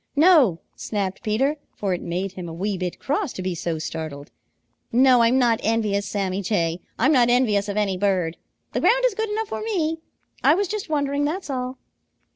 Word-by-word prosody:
"No!" 285 - +5
snapped 195 -3 -3
Peter, 265 +8 0 0.2
for 195 -3 -1
it 175 - -3
made 180 +3 -3
him 180 -2 -7
a - - -7
wee 195 +4 -2
bit 180 -1 -4
cross 295 - -1
to 185 - -6
be 185 0 -1
so 170 -1 -3
startled. 155 -2 -6 0.6
"No, 250 0 +5
I'm 230 +3 +4
not 235 -3 +3
envious, 210 -2 0
Sammy 195 -1 -2
Jay. 175 -4 -1 0.2
I'm 260 +6 +3
not 245 -5 +4
envious 215 -5 +2
of 200 - -3
any 200 -3 +1
bird. 180 -4 0 0.4
The - - 0
ground - - +3
is - - +2
good 440 +1 -2
enough 435 +1 -2
for - - -4
me. 330 -8 -1 0.4
I 305 - +6
was 400 +2 0
just 415 -2 -4
wondering, 285 -1 0
that's 315 +1 -3
all." 255 0 -3
225 Hz, 195 wpm, -23 LUFS, 185-290 Hz, 0.6 s, I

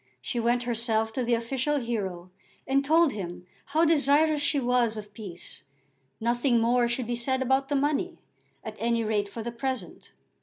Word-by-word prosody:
She 185 - -3
went 240 +1 +1
herself 225 -2 0
to 255 - -1
the 240 0 +2
official 260 +5 -1
hero 190 -7 -4 0.3
and 275 +1 +2
told 320 +2 +4
him 180 -3 -6 0.2
how 315 +3 +2
desirous 300 0 +3
she 285 0 +3
was 245 -3 +1
of 210 -1 -9
peace. 195 -5 -9 0.6
Nothing 240 +2 +2
more 240 +1 +3
should 240 +1 -1
be 240 - -3
said 260 +2 0
about 265 +1 +1
the 290 - 0
money, 295 +5 0 0.5
at 220 -1 -7
any 230 0 +1
rate 210 -2 0
for 225 +3 -6
the 235 - -4
present. 260 +2 -5
240 Hz, 175 wpm, -27 LUFS, 225-275 Hz, 0.6 s, told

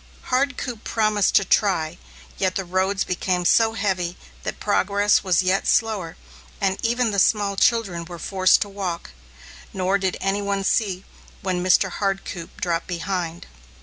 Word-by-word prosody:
Hardcoop 255 -3 -1
promised 215 -3 +1
to 195 - +5
try, 175 -5 +1 0.4
yet 185 -1 0
the 190 - -2
roads 190 +2 0
became 180 0 -1
so 225 +4 +4
heavy 185 -5 -1 0.2
that - - -5
progress 205 0 +2
was 185 -1 +2
yet 185 +2 +1
slower 205 -7 +1 0.4
and 195 -1 -1
even 235 0 +1
the 200 - 0
small 200 0 +2
children 195 -6 +1
were 175 0 -9
forced 185 +2 +3
to 205 - -12
walk, 190 - -5 0.6
nor 190 +1 +1
did 190 -1 -1
any 195 +1 0
one 200 -1 -1
see 195 -2 0 0.4
when 180 -2 -1
Mr. 185 +1 +3
Hardcoop 195 -4 -4
dropped 170 -1 -1
behind. 175 -1 -3
195 Hz, 150 wpm, -23 LUFS, 180-205 Hz, 0.6 s, to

